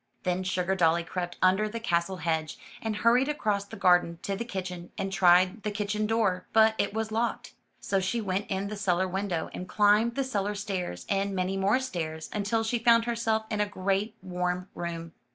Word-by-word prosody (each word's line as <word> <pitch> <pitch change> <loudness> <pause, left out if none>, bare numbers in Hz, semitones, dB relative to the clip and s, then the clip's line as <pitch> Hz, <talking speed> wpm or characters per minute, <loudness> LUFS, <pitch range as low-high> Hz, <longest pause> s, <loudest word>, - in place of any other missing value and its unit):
Then 180 -1 0
Sugardolly 180 -2 +1
crept 175 0 -4
under 190 +4 +3
the 230 +2 -5
castle 185 -3 0
hedge, 160 -2 -2 0.2
and 220 -1 -2
hurried 240 +5 +3
across 210 -9 -1
the 200 - -10
garden 175 -2 +3
to 200 - -2
the 220 - -3
kitchen, 180 -5 -6
and 195 0 -3
tried 185 +3 +4
the 210 - -2
kitchen 210 +1 -1
door, 215 -5 0
but 220 0 +6
it 200 - +1
was 220 +1 -3
locked. 230 +2 -2 0.3
So 195 - 0
she 190 +5 -1
went 195 -2 -2
in 195 +1 -1
the 210 - -5
cellar 190 -2 +1
window, 185 -3 -2
and 180 - -7
climbed 210 +3 +3
the 275 - +1
cellar 205 -5 -2
stairs, 185 - -4
and 195 0 0
many 185 +1 -1
more 195 +6 +2
stairs, 160 -11 -4
until 215 +2 0
she 230 +2 0
found 230 0 +5
herself 225 -2 0
in 210 -1 0
a 210 - +1
great 200 +2 -1
warm 180 0 -2
room. 170 -1 -5
195 Hz, 190 wpm, -28 LUFS, 180-220 Hz, 0.3 s, but